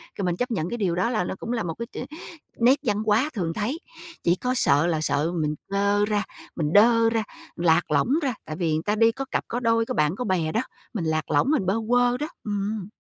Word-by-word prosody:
kiểu, 195 - -2
mình 175 -1 0
chấp 245 0 -2
nhận 175 -5 -1
cái 240 - -3
điều 180 -5 0
đó 190 +6 +1
là 215 -6 0
nó 190 - -4
cũng 235 - -5
là 230 -3 -1
một 165 -1 -3
cái 235 - -2 0.2
ch 300 - -15 0.5
nét 255 +4 +5
văn 210 -6 +1
hóa 220 +8 +3
thường 170 -7 -2
thấy. 235 - -2 0.4
Chỉ 175 +1 +3
có 250 +6 -1
sợ 155 - +3
là 160 -2 0
sợ 155 +2 0
mình, 150 0 -1
ơ, 200 +1 +2
ra, 210 -1 +1 0.3
mình 150 -1 -1
đơ 230 +2 +6
ra, 225 -1 0 0.3
lạc 165 -2 +2
lõng 150 - +2
ra, 260 - 0
tại 155 - -5
vì 170 -2 -1
người 155 - -1
ta 210 +3 0
đi 225 +1 +4
có 270 +4 -5
cặp - - 0
có 240 - -2
đôi 230 -1 +2
có - - -3
bạn 150 +3 +1
có 250 - -3
bè 170 -5 0
đó, 225 - +1 0.3
mình 185 -8 -2
lạc 155 -2 -1
lõng, 250 - +3
mình 275 -11 +1
bơ 190 +3 +1
quơ 245 0 +3
đó, 300 - -3 0.2
ừm. 205 -1 -3
205 Hz, 255 wpm, -25 LUFS, 170-235 Hz, 0.5 s, đơ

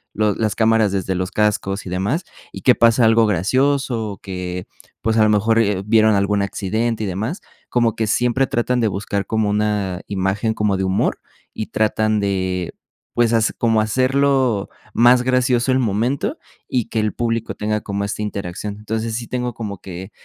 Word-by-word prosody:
los 105 -2 +1
las 110 -2 0
cámaras 110 -2 +3
desde 95 -1 -1
los 90 +1 -2
cascos 105 -1 0
y - - -4
demás 100 - -1 0.3
y - - -9
que 125 - +5
pasa 115 0 +4
algo 115 0 +5
gracioso, 115 +3 +1
o 100 - -8
que 90 -1 -5 0.3
pues 110 +1 0
a 110 - +5
lo 105 - +4
mejor, 110 +2 +2
eh, 100 -4 +1
vieron 110 0 +4
algún 100 +1 +1
accidente 110 +3 -2
y - - -2
demás, 110 - -3 0.3
como 120 -3 +2
que 110 - -1
siempre 125 +4 +1
tratan 125 +1 0
de 110 - +3
buscar 100 0 -3
como 110 0 0
una 105 -3 -1
imagen 100 +3 -1
como 105 -3 0
de 95 - -1
humor 95 +1 0 0.3
y 110 - -4
tratan 110 0 +1
de, 95 -3 -1 0.4
pues, 120 -1 +2
has 115 -1 +2
como 115 -2 +2
hacerlo 130 -1 +1 0.2
más 120 +1 +5
gracioso 125 0 +2
el 130 - +2
momento 120 +4 0 0.3
y 125 -4 0
que 110 - -1
el 105 0 0
público 115 -1 -2
tenga 105 0 -1
como 100 0 -3
esta 100 - -4
interacción, 100 0 -4
entonces 110 +1 -3
sí 115 0 -4
tengo 125 -1 -3
como 105 -4 -6
que 95 +2 -8
110 Hz, 180 wpm, -20 LUFS, 100-115 Hz, 0.4 s, que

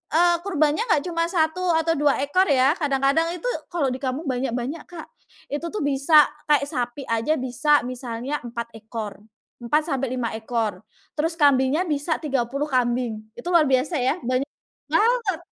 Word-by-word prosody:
eee, 345 +1 +5
kurbannya 310 -4 +1
nggak 295 -5 +3
cuma 335 -1 0
1 325 0 0 0.2
atau 325 0 +1
2 290 -2 +3
ekor 370 +7 +2
ya, 270 +1 +4
kadang-kadang 280 +2 +2
itu - - -5 0.2
kalau 310 -7 0
di 260 - -6
kampung 270 +4 -3
banyak-banyak, 255 +4 -2
Kak. 340 -3 -9 0.4
Itu 295 +4 -3
tuh 425 - -2
bisa 285 +2 +5 0.2
kayak 295 -2 +3
sapi 250 -1 -3
aja 230 +7 +1
bisa 260 +4 +2
misalnya 255 +3 -4
4 235 -1 -6
ekor, 215 -2 -7 0.4
4-5 260 -3 0
ekor. 220 -3 -2 0.3
Terus 320 +2 0
kambingnya 285 +2 +4
bisa 300 +1 -1
30 275 -1 -1
kambing, 240 -4 -1
itu - - -8
luar 335 -2 +6
biasa 265 +5 +1
ya? 255 +1 +1
Banyak 255 +3 0 0.4
banget! 445 -6 +2
280 Hz, 150 wpm, -23 LUFS, 250-315 Hz, 0.4 s, luar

